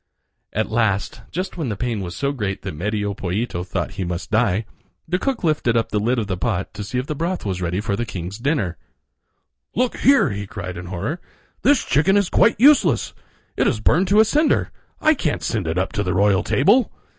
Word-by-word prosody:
At 110 +1 -2
last, 110 -4 0
just 185 +2 -4
when 155 -7 -2
the 105 - -2
pain 120 -3 -2
was 90 -2 -6
so 140 +7 -1
great 105 -8 -3
that 95 - -4
Medio 105 +4 -2
Pollito 95 0 -3
thought 90 -1 -3
he 95 0 -4
must 90 +1 -4
die, 110 -2 +2 0.4
the 180 +3 0
cook 260 0 -2
lifted 150 -8 +2
up 115 - 0
the 105 - +1
lid 120 +5 +1
of 115 - 0
the 100 -2 -2
pot 95 -2 -2
to 105 0 -6
see 115 +5 -4
if 125 - -1
the 150 - -3
broth 170 +2 -3
was 95 -2 -2
ready 90 +1 -1
for 105 -1 -1
the 120 - -2
king's 95 -2 -6
dinner. 125 - -1 1.0
"Look 250 0 0
here!" 275 - +4
he 100 0 -5
cried 90 -3 -6
in 90 +1 -7
horror, 100 - -4 0.4
"this 285 -2 +3
chicken 190 +7 +3
is 200 -3 +1
quite 230 - +4
useless. 220 - +4 0.4
It - - +2
is - - +1
burned 175 - +3
to 205 +3 +4
a 220 - +7
cinder. 300 +7 +2 0.3
I 310 0 +4
can't 165 - -2
send 105 -8 -1
it 80 +2 -1
up 95 - 0
to 110 - -1
the 90 -3 -1
royal 100 -1 +3
table." 205 - +3
110 Hz, 215 wpm, -21 LUFS, 95-160 Hz, 1.0 s, a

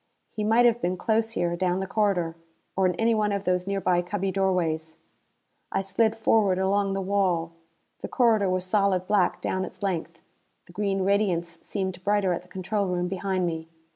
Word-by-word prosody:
He 215 - -4
might 225 +3 +4
have 240 0 +3
been 180 +1 -1
close 225 +3 0
here 175 -5 0
down 180 +1 0
the 190 - -2
corridor. 190 -5 0 0.4
Or 190 -1 +3
in 180 - -1
any 225 +4 +2
one 210 -1 +1
of 200 -1 -2
these 180 -1 0
nearby 185 -3 +1
cubby 195 +2 -2
doorways. 170 -5 -1 0.7
I - - 0
slid 215 +4 +1
forward 215 -4 +3
along 195 +1 +1
the 195 - -2
wall. 185 -4 0 0.5
The - - -5
corridor 225 -6 +3
was 185 0 -1
solid 190 -2 +1
black 195 -2 +1
down 185 - -1
its 200 - -9
length: 170 -3 -3 0.5
the 175 - -17
green 195 -1 -1
radiance 180 -4 0
seemed 190 -3 -4
brighter 205 -2 +2
at 175 - -3
the 180 - -20
control 195 +2 -2
room 180 -1 -1
behind 190 -1 -1
me. 160 -1 -3
190 Hz, 185 wpm, -26 LUFS, 180-205 Hz, 0.7 s, might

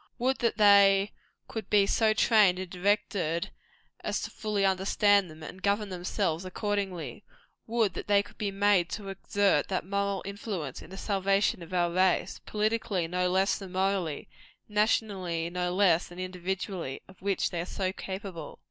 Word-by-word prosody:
Would 255 +2 0
that 235 -3 0
they 200 -1 +6 0.4
could 220 -4 -6
be 205 -1 +5
so 220 +2 +3
trained 210 -5 +5
and 185 0 -4
directed 180 -3 0 0.5
as - - -2
fully 210 -2 -2
to - - +5
understand 195 0 +3
them, 155 0 -12
and 185 +4 -9
govern 205 +1 0
themselves 180 -1 -2
accordingly! 185 - -3 0.4
Would 225 -4 +1
that - - -6
they 200 -1 +4
could - - -18
be 210 - -1
made 195 -3 +2
to 205 -3 -5
exert 195 -4 +1
that 185 -3 -2
moral 200 0 -1
influence 200 - -5
in - - -12
the 190 - -9
salvation 195 -1 +1
of 170 - -10
our 175 -1 +1
race 185 0 +1
politically 210 -4 0
no 180 +1 0
less 190 +2 +2
than 190 -2 -9
morally, 190 -5 -1 0.4
nationally 195 -6 0
no 180 0 -1
less 180 -3 +3
than 175 - -13
individually 185 -4 -4
of 190 - -18
which 195 0 0
they 170 - -2
are - - -4
so 190 -1 -2
capable. 190 -6 -7
195 Hz, 165 wpm, -29 LUFS, 180-205 Hz, 0.5 s, they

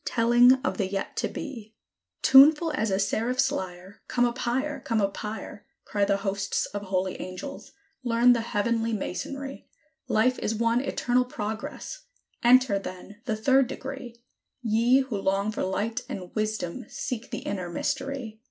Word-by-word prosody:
telling 240 +2 +5
of - - -1
the 195 - +1
yet 195 0 -4
to - - 0
be. 225 -7 -8 0.5
Tuneful 300 +4 +7
as 220 -7 0
a 190 - +1
seraph's 245 +6 +1
lyre, 185 -4 -6
"Come 245 -1 +2
up 240 +1 -2
higher! 265 +4 -1
Come 230 -4 -1
up 200 -1 0
higher!" 210 -1 -7 0.2
Cry 205 -1 +1
the 200 0 +2
hosts 195 0 -1
of 205 - -5
holy 185 -1 -1
angels; 185 +10 -7 0.3
"learn 240 0 +5
the 235 - 0
heavenly 230 +1 0
Masonry: 270 +7 -5 0.4
Life 250 +4 +2
is 220 - -1
one 230 +2 +2
eternal 250 -2 +1
progress: 220 - -6 0.4
enter, 245 -4 +5
then, 195 +3 -9
the 220 - 0
Third 265 +4 +3
Degree; 265 -2 -7 0.5
Ye 235 +4 +4
who 240 -7 -3
long 195 +2 +1
for 220 - -4
light 205 +4 -1
and 180 -2 -6
wisdom 215 0 -2
seek 250 -5 -5
the - - -5
Inner 185 -3 -3
Mystery! 270 +1 -3
230 Hz, 155 wpm, -27 LUFS, 200-255 Hz, 0.5 s, Tuneful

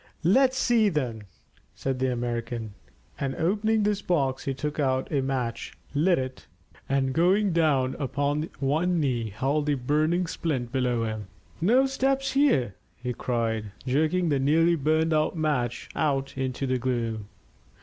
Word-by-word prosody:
"Let's 260 +9 +4
see, 235 -5 +3
then," 125 - -3 0.5
said 135 -1 -2
the 130 0 +1
American, 120 -2 -3 0.5
and 135 -1 -2
opening 210 +5 +1
his 205 -1 +1
box 135 -8 0
he 135 - -1
took 150 +3 -4
out 130 -2 0
a 140 -3 +1
match, 125 -3 -3 0.2
lit 170 +5 +3
it, 130 0 -5 0.4
and 135 -1 +1
going 185 +4 +3
down 145 -6 +2
upon 145 +3 -1
one 160 +6 +1
knee 120 -6 0
held 140 +8 -1
the 145 - +2
burning 155 +7 +1
splint 135 -8 -3
below 125 -3 0
him. 110 -2 -4 0.3
"No 245 +10 +4
steps 270 0 0
here," 265 - +3 0.2
he 125 0 -4
cried, 115 -4 -2
jerking 160 +6 +1
the 140 -2 +2
nearly 160 +5 +3
burned 160 +2 +1
out 155 +2 +1
match 125 -6 -1
out 135 -3 0
into 130 0 -2
the 130 -1 0
gloom. 115 -4 -2
140 Hz, 150 wpm, -26 LUFS, 125-165 Hz, 0.5 s, Let's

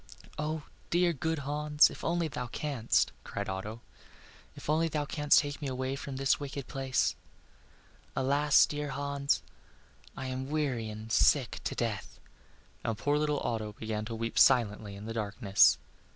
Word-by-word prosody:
"Oh, 155 0 -2 0.3
dear, 175 0 +3
good 160 +3 -1
Hans! 150 +1 +4
if - - -10
only 170 0 +1
thou 125 -4 -4
canst!" 130 -2 0
cried - - -4
Otto; 105 +4 -5 0.7
"if - - -10
only 160 +2 +2
thou 150 -2 -1
canst 145 0 +3
take 145 0 0
me 145 - -2
away 130 +1 -2
from 140 -1 -6
this 135 0 +2
wicked 140 -1 -5
place. 135 -1 0 1.0
Alas, 145 +2 +4
dear 150 -1 -4
Hans! 140 +1 -1 0.7
I - - -4
am 130 +1 -4
weary 135 -7 -1
and 110 +1 -8
sick 130 +2 +3
to - - -2
death." 110 -5 -3 0.6
And 115 -2 -1
poor 145 +5 +1
little 150 -1 0
Otto 110 -2 -2
began 110 0 -4
to 115 +1 -5
weep 115 0 -1
silently 105 -5 +4
in 100 +1 -9
the 115 - -4
darkness. 100 -2 +4
135 Hz, 155 wpm, -31 LUFS, 115-150 Hz, 1.0 s, Hans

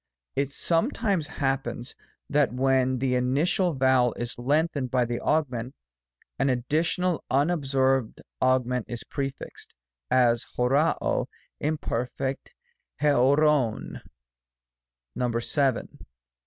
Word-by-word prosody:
It 140 0 0
sometimes 175 - 0
happens 135 -4 -3 0.3
that 145 -2 +2
when 130 0 +2
the 130 0 0
initial 145 +8 +1
vowel 130 -3 +3
is 120 0 -4
lengthened 145 +1 0
by 125 0 +2
the 120 0 -3
augment, 130 -5 -1 0.6
an 135 +1 +2
additional 160 +7 0
un 145 +6 +2
absorbed 135 -6 +1 0.2
augment 125 -2 +1
is 120 -1 -5
prefixed; 135 -1 -6 0.3
as, 120 -2 +3
oqcc 140 +6 +2
cj^ - - -1 0.3
Imper. 145 -5 -1
k 135 0 -1 0.6
coqcov. 140 -3 +2 1.2
Vn. 125 +2 0
135 Hz, 100 wpm, -26 LUFS, 125-150 Hz, 1.2 s, vowel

